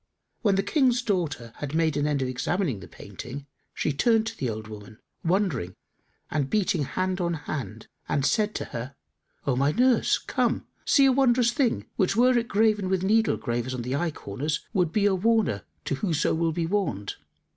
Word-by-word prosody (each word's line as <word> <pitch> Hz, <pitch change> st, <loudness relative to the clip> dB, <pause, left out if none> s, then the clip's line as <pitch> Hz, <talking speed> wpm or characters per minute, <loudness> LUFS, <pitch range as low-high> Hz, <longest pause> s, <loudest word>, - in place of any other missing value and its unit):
When 205 Hz, -3 st, +3 dB
the 195 Hz, -, +1 dB
King's 250 Hz, +1 st, +2 dB
daughter 165 Hz, -, -2 dB
had 145 Hz, +1 st, -4 dB
made 160 Hz, -2 st, +2 dB
an 145 Hz, 0 st, +1 dB
end 145 Hz, -3 st, 0 dB
of -, -, -1 dB
examining 135 Hz, -, -1 dB
the 90 Hz, -, -10 dB
painting, 135 Hz, +3 st, -9 dB, 0.3 s
she 155 Hz, -, -1 dB
turned 225 Hz, -, +3 dB
to 225 Hz, 0 st, -4 dB
the 130 Hz, -, -2 dB
old 110 Hz, -1 st, -5 dB
woman, 105 Hz, 0 st, -10 dB, 0.3 s
wondering 165 Hz, -, 0 dB, 0.6 s
and 145 Hz, -3 st, 0 dB
beating 190 Hz, -6 st, +1 dB
hand 185 Hz, +4 st, -2 dB
on 170 Hz, -1 st, 0 dB
hand, 135 Hz, -7 st, -6 dB, 0.2 s
and 140 Hz, -, +1 dB
said 215 Hz, +2 st, +1 dB
to -, -, -3 dB
her, 125 Hz, +4 st, -6 dB, 0.5 s
"O 135 Hz, -, +1 dB
my 140 Hz, +3 st, +2 dB
nurse, 250 Hz, +6 st, +3 dB
come, -, -, -1 dB, 0.2 s
see 275 Hz, -, +5 dB
a 270 Hz, -, +6 dB
wondrous 250 Hz, -2 st, +3 dB
thing 245 Hz, -1 st, 0 dB
which 195 Hz, -1 st, +2 dB
were 250 Hz, +2 st, +5 dB
it 235 Hz, -1 st, +1 dB
graven 210 Hz, -3 st, +2 dB
with 190 Hz, -1 st, 0 dB
needle 220 Hz, +3 st, +3 dB
gravers 120 Hz, +1 st, -2 dB
on 120 Hz, -, -4 dB
the 125 Hz, +3 st, -2 dB
eye 170 Hz, +4 st, 0 dB
corners 150 Hz, +3 st, -4 dB
would 180 Hz, -6 st, +2 dB
be 205 Hz, +2 st, +2 dB
a 205 Hz, -, +4 dB
warner 205 Hz, -, +1 dB, 0.2 s
to -, -, -1 dB
whoso 160 Hz, +1 st, 0 dB
will 165 Hz, 0 st, +1 dB
be 165 Hz, +1 st, -1 dB
warned." 165 Hz, -, -2 dB
170 Hz, 190 wpm, -26 LUFS, 135-215 Hz, 0.6 s, a